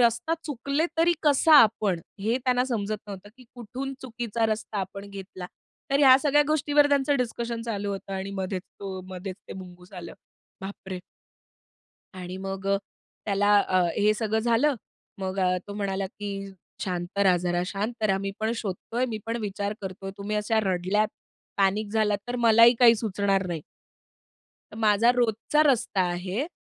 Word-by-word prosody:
रस्ता 235 Hz, +6 st, +2 dB
चुकले 285 Hz, +3 st, -1 dB
तरी 340 Hz, +1 st, +5 dB
कसा 300 Hz, +1 st, +4 dB
आपण? 210 Hz, -5 st, +1 dB, 0.2 s
हे 225 Hz, +5 st, +1 dB
त्यांना 250 Hz, -1 st, +2 dB
समजत 215 Hz, -4 st, -2 dB
नव्हतं 200 Hz, 0 st, -9 dB
की 255 Hz, -, -16 dB
कुठून 250 Hz, +3 st, -6 dB
चुकीचा 235 Hz, -2 st, -2 dB
रस्ता 215 Hz, -1 st, -3 dB
आपण 195 Hz, +1 st, -6 dB
घेतला, 190 Hz, -2 st, -8 dB, 0.4 s
तर 275 Hz, -, +3 dB
ह्या 265 Hz, -3 st, +8 dB
सगळ्या 295 Hz, 0 st, +4 dB
गोष्टींवर 295 Hz, -1 st, +3 dB
त्यांचं 285 Hz, 0 st, +2 dB
डिस्कशन 235 Hz, -2 st, -3 dB
चालू 205 Hz, -3 st, -3 dB
होतं 195 Hz, 0 st, -6 dB
आणि 190 Hz, +1 st, -4 dB
मध्येच 185 Hz, -1 st, -3 dB, 0.2 s
तो 190 Hz, -2 st, -5 dB
मधेच 185 Hz, +1 st, -6 dB
ते -, -, -6 dB
मुंगूस 180 Hz, +1 st, -15 dB
आलं. 175 Hz, -3 st, -8 dB, 0.5 s
बापरे! 190 Hz, -1 st, -7 dB, 1.1 s
आणि 185 Hz, 0 st, -7 dB
मग 195 Hz, 0 st, -5 dB
अ, 200 Hz, 0 st, +3 dB, 0.5 s
त्याला 205 Hz, 0 st, +2 dB
अ, 185 Hz, 0 st, +3 dB, 0.2 s
हे 210 Hz, +1 st, +4 dB
सगळं 220 Hz, 0 st, -1 dB
झालं, 235 Hz, +5 st, +2 dB, 0.4 s
मग 190 Hz, 0 st, -3 dB
अ, 185 Hz, -1 st, +2 dB
तो 200 Hz, -, -6 dB
म्हणाला, 195 Hz, -1 st, -2 dB
की 200 Hz, -1 st, -6 dB, 0.3 s
शांत 180 Hz, +1 st, -4 dB
रहा, 190 Hz, -3 st, +5 dB
जरा 175 Hz, 0 st, -1 dB
शांत 215 Hz, +4 st, -4 dB
रहा, 195 Hz, -3 st, +3 dB
मी 195 Hz, 0 st, -3 dB
पण 220 Hz, +1 st, 0 dB
शोधतोय, 225 Hz, +4 st, -3 dB
मी 230 Hz, -4 st, -4 dB
पण 230 Hz, +1 st, -2 dB
विचार 205 Hz, 0 st, -3 dB
करतोय. 195 Hz, 0 st, -6 dB
तुम्ही 205 Hz, +1 st, -3 dB
अशा 215 Hz, +1 st, +1 dB
रडल्यात, 190 Hz, +3 st, +1 dB, 0.5 s
पॅनिक 200 Hz, +2 st, +1 dB
झालात, 215 Hz, -2 st, +2 dB
तर 245 Hz, -, -2 dB
मलाही 230 Hz, 0 st, +6 dB
काही 235 Hz, -2 st, +8 dB
सुचणार 200 Hz, -3 st, 0 dB
नाही. 165 Hz, -3 st, -3 dB, 1.1 s
तर -, -, -11 dB
माझा 220 Hz, +1 st, +4 dB
रोजचा 240 Hz, +5 st, +2 dB
रस्ता 235 Hz, -7 st, +2 dB
आहे. 185 Hz, -, -2 dB
210 Hz, 160 wpm, -26 LUFS, 195-235 Hz, 1.1 s, ह्या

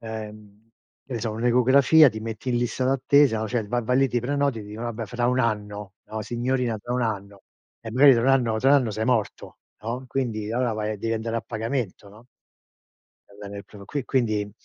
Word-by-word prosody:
ehm, 110 Hz, -1 st, -9 dB, 0.4 s
che 135 Hz, -, -8 dB
ne 115 Hz, -, -3 dB
so, 115 Hz, -, -2 dB
un'ecografia, 125 Hz, +6 st, +5 dB
ti 110 Hz, -3 st, -6 dB
metti 115 Hz, +3 st, -6 dB
in 120 Hz, -, +1 dB
lista 120 Hz, +1 st, -1 dB
d'attesa, 135 Hz, -2 st, +3 dB
no, 110 Hz, -, -2 dB
cioè, 120 Hz, -4 st, -2 dB
vai 120 Hz, +1 st, -1 dB
vai 125 Hz, +2 st, +2 dB
lì, 135 Hz, -, +3 dB
ti 120 Hz, -, 0 dB
prenoti 140 Hz, -1 st, -1 dB
e -, -, -8 dB
ti 105 Hz, -, -12 dB
dicono: 110 Hz, +3 st, -6 dB
"Vabbè, 115 Hz, -1 st, -4 dB
fra 120 Hz, 0 st, -1 dB
1 125 Hz, +1 st, +1 dB
anno", 105 Hz, -3 st, -3 dB
no, 110 Hz, 0 st, -6 dB
"Signorina, 120 Hz, -1 st, -1 dB
tra 120 Hz, +4 st, -5 dB
1 125 Hz, -, 0 dB
anno". 100 Hz, -3 st, -4 dB, 0.4 s
E 110 Hz, -, -8 dB
magari 135 Hz, +2 st, +7 dB
tra 115 Hz, -, +1 dB
1 130 Hz, -, +2 dB
anno 120 Hz, -5 st, +2 dB
tra 135 Hz, +4 st, +3 dB
1 145 Hz, -, +7 dB
anno 125 Hz, -5 st, +1 dB
sei 110 Hz, +2 st, -2 dB
morto, 115 Hz, -3 st, -2 dB, 0.2 s
no, 120 Hz, +4 st, -4 dB
quindi 110 Hz, -6 st, -2 dB
allora 125 Hz, -1 st, 0 dB
vai 110 Hz, 0 st, -2 dB
a 105 Hz, -, -5 dB
devi 115 Hz, +3 st, -2 dB
andare 115 Hz, +1 st, -3 dB
a 115 Hz, -, -2 dB
pagamento, 110 Hz, -3 st, -4 dB
no? 110 Hz, +4 st, -17 dB, 1.0 s
Va 100 Hz, -, -19 dB
bene 100 Hz, 0 st, -7 dB
e 100 Hz, -, -9 dB
pro 100 Hz, -2 st, -13 dB
qui 145 Hz, +2 st, -4 dB
quindi 110 Hz, -6 st, 0 dB
115 Hz, 225 wpm, -24 LUFS, 110-125 Hz, 1.0 s, magari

